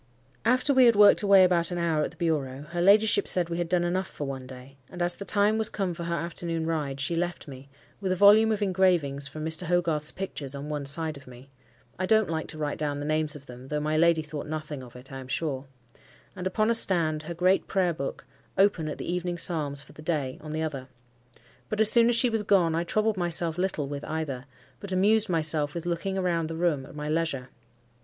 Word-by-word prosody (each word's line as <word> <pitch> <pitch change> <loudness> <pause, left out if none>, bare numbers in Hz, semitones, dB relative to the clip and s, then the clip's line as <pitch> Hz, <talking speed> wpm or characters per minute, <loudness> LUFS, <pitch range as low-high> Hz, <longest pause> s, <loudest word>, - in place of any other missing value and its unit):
After 255 +4 +2
we 260 -1 +6
had 235 -2 +5
worked 205 0 +6
away 195 -2 +6
about 175 -2 +3
an 175 - -4
hour 165 -3 0
at - - -2
the - - -19
bureau, 145 -6 -2
her 175 0 -2
ladyship 205 +2 +4
said 175 -2 +2
we 170 0 -3
had 170 -1 -2
done 180 -1 +1
enough 185 +2 -1
for 145 - -6
one 135 -2 -6
day; 130 +1 -12
and 180 - -10
as 175 0 +2
the 200 - -8
time 205 +3 +2
was 220 - +4
come 195 -4 -2
for 170 0 -6
her 170 0 -1
afternoon 170 -1 -3
ride, 150 -4 -2
she 145 +5 -1
left 175 0 -3
me, 135 0 -11 0.3
with 190 -2 -2
a - - +2
volume 210 +4 +6
of 210 -1 0
engravings 175 -8 +1
from 155 +2 -7
Mr. 160 +2 -1
Hogarth's 165 -4 +2
pictures 145 -8 -5
on 140 +2 -7
one 145 -2 -3
side 155 +1 0
of 135 - -16
me 125 +2 -14 0.5
(I 185 - -1
don't 220 -4 +3
like 160 -1 -3
to 155 - -7
write 150 -1 -3
down 145 -2 -2
the 145 - -5
names 155 0 0
of 140 -1 -11
them, 125 0 -11
though 150 +2 -2
my 155 +1 -1
lady 165 0 +3
thought 150 -1 -7
nothing 155 -2 -5
of 125 -2 -13
it, 125 +2 -11
I 135 - -7
am 130 - -10
sure), 135 -1 -3 0.7
and 185 0 -3
upon 215 +4 +1
a - - +3
stand 165 -8 +2
her 170 +2 -7
great 185 +3 +2
prayer 185 -3 +1
book 140 -3 -6 0.3
open 190 -5 +2
at 150 - -5
the - - -6
evening 175 0 -2
psalms 150 -5 0
for - - -17
the - - -12
day, 150 -5 -2
on 155 - -9
the 155 +1 -2
other. 135 -5 -5 0.8
But 215 - -3
as 220 -1 +5
soon 235 0 +5
as 240 - +3
she 240 +1 +3
was 225 -1 0
gone, 190 -5 +2
I 165 +1 0
troubled 215 +4 0
myself 170 -2 -1
little 180 -6 -1
with 145 +1 -6
either, 145 -5 -4 0.3
but 200 - -8
amused 210 +3 +3
myself 155 -3 +2
with 170 0 -5
looking 190 +3 -2
round 170 -3 -1
the 165 - -5
room 160 -6 -1
at - - -13
my 150 0 -5
leisure. 155 -5 -2
165 Hz, 240 wpm, -27 LUFS, 150-185 Hz, 0.8 s, we